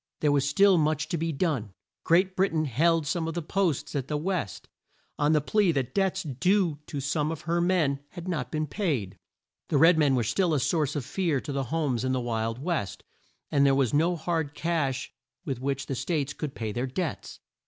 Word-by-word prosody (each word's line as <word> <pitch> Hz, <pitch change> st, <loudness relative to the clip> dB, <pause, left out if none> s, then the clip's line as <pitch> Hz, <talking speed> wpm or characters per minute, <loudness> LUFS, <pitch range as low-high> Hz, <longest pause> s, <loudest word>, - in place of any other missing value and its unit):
There 150 Hz, -, +3 dB
was 140 Hz, -1 st, +2 dB
still 195 Hz, +3 st, +5 dB
much 155 Hz, 0 st, 0 dB
to 170 Hz, -, -1 dB
be 165 Hz, +1 st, -1 dB
done. 135 Hz, -, -1 dB, 0.3 s
Great 185 Hz, +3 st, +3 dB
Brit 195 Hz, +1 st, +2 dB
ain 155 Hz, -1 st, +1 dB
held 160 Hz, +5 st, +2 dB
some 160 Hz, +2 st, -1 dB
of 165 Hz, -, -4 dB
the 170 Hz, -, -2 dB
posts 160 Hz, -5 st, -1 dB
at 135 Hz, -2 st, -2 dB
the 150 Hz, -, -1 dB
West, 165 Hz, -, -3 dB, 0.5 s
on 150 Hz, +1 st, +3 dB
the 150 Hz, -, +3 dB
plea 200 Hz, +4 st, +2 dB
that 135 Hz, -4 st, -2 dB
debts 190 Hz, -1 st, +1 dB
due 170 Hz, +2 st, +1 dB
to 145 Hz, -, -4 dB
some 150 Hz, +3 st, -1 dB
of 160 Hz, -2 st, -5 dB
her 170 Hz, +2 st, 0 dB
men 170 Hz, -6 st, +2 dB
had 175 Hz, 0 st, -8 dB
not 150 Hz, -9 st, -2 dB
been 155 Hz, 0 st, -1 dB
paid; 135 Hz, -, -2 dB, 0.5 s
the 150 Hz, -, +1 dB
red 165 Hz, +3 st, +6 dB
men 145 Hz, -3 st, +4 dB
were 120 Hz, -, +1 dB
still 160 Hz, -, +1 dB
a -, -, +2 dB
source 150 Hz, +2 st, 0 dB
of 140 Hz, -5 st, -2 dB
fear 170 Hz, -5 st, 0 dB
to -, -, -6 dB
the 135 Hz, -1 st, -1 dB
homes 135 Hz, -3 st, -1 dB
in 130 Hz, 0 st, 0 dB
the 130 Hz, -, +1 dB
Wild 115 Hz, -1 st, -2 dB
West; 150 Hz, -, -3 dB, 0.5 s
and 140 Hz, -1 st, +3 dB
there 135 Hz, -1 st, +5 dB
was 135 Hz, -4 st, +1 dB
no 165 Hz, +4 st, +3 dB
hard 160 Hz, -3 st, -2 dB
cash 145 Hz, -6 st, -1 dB, 0.3 s
with 135 Hz, -6 st, -3 dB
which 135 Hz, 0 st, -2 dB
the 135 Hz, -, -3 dB
States 145 Hz, +1 st, -1 dB
could 150 Hz, -4 st, -5 dB
pay 110 Hz, -2 st, -3 dB
their 120 Hz, +5 st, -2 dB
debts. 130 Hz, -, -4 dB
150 Hz, 215 wpm, -27 LUFS, 135-170 Hz, 0.5 s, red